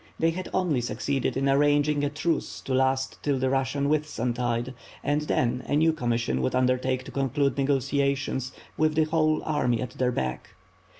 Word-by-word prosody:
They 165 0 +2
had 185 +2 -5
only 175 -9 +1
succeeded 135 +2 -1
in 135 +1 +1
ar 135 0 +4
ranging 145 0 +2
a 145 - +1
truce 150 +2 -2
to 135 - -4
last 130 0 +1
till 145 -2 0
the 130 0 0
Russian 135 +1 0
Whitsuntide; 125 -5 -1 0.3
and 145 +1 +1
then 125 -4 0
a - - +1
new 160 +2 +4
commission 115 - -1
would 65 - 0
undertake 130 0 +1
to 135 - -10
conclude 140 +1 0
negotiations, 140 -1 0 0.3
with 155 0 +2
the 160 - +4
whole 155 0 +1
army 125 -6 0
at 125 0 -4
their 125 -1 0
back. 65 - -4
135 Hz, 175 wpm, -26 LUFS, 125-150 Hz, 0.3 s, ar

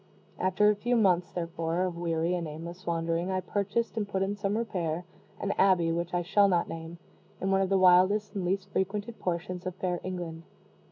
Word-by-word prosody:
After 185 +3 +3
a - - 0
few 240 +4 0
months, 180 -6 +3
therefore, 170 0 -2
of 180 -2 -2
weary 170 0 0
and 175 -2 -2
aimless 170 +4 -8
wandering, 165 +1 0
I 190 0 0
purchased 205 +5 -1
and 215 -2 -1
put 190 -1 0
in 200 +1 -1
some 205 0 -1
repair, 175 -7 -2 0.3
an - - -1
abbey, 180 -4 +4
which 170 +1 -2
I 175 - +1
shall 200 +3 +4
not 175 -3 +2
name, 165 +1 -7 0.4
in 195 - -1
one 195 0 +3
of 190 - +1
the 195 - +3
wildest 185 +3 +5
and 195 -3 -3
least 190 +2 -1
frequented 205 +4 -2
portions 180 +1 -3
of 185 - -4
fair 180 -2 -2
England. 175 -3 -5
185 Hz, 200 wpm, -29 LUFS, 170-195 Hz, 0.4 s, wildest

